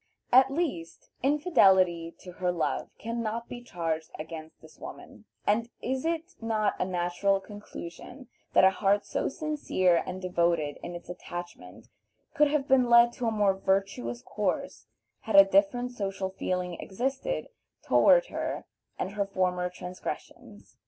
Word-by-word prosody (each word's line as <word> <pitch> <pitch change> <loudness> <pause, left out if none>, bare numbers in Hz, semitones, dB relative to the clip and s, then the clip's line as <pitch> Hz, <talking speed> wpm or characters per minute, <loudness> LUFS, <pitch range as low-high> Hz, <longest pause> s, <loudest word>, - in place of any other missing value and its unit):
At 260 +2 +7
least, 275 - -4
infidelity 190 - +3
to 180 - -10
her 180 0 -1
love 175 -2 -2
can 230 +1 -4
not 230 +1 -3
be 240 - -8
charged 165 -7 -3
against 160 0 -8
this - - -17
woman, - - -10 0.2
and 225 +3 +1
is 260 +3 -2
it 335 +2 -2
not 220 -2 +1
a - - +1
natural 185 +2 0
conclusion 205 +4 -10 0.3
that - - +6
a 190 - +7
heart 200 +1 +1
so - - -1
sincere 270 - +1
and 185 0 -6
devoted 170 -5 0
in 175 - -6
its 175 - -9
attachment 175 - -8 0.5
could 300 +1 +4
have 285 -1 0
been 255 -2 +4
led 235 0 +7
to 240 -1 -3
a - - +2
more 205 -3 +3
virtuous 190 -12 -1
course 210 +7 -3 0.3
had 220 - -3
a 195 0 +10
different 200 +6 +2
social 195 -4 -3
feeling 180 -2 -3
existed 265 - -3 0.3
toward - - +5
her - - -4 0.3
and 185 - -3
her 200 -1 -1
former 180 -2 0
transgressions? 180 0 -8
195 Hz, 145 wpm, -28 LUFS, 180-245 Hz, 0.5 s, a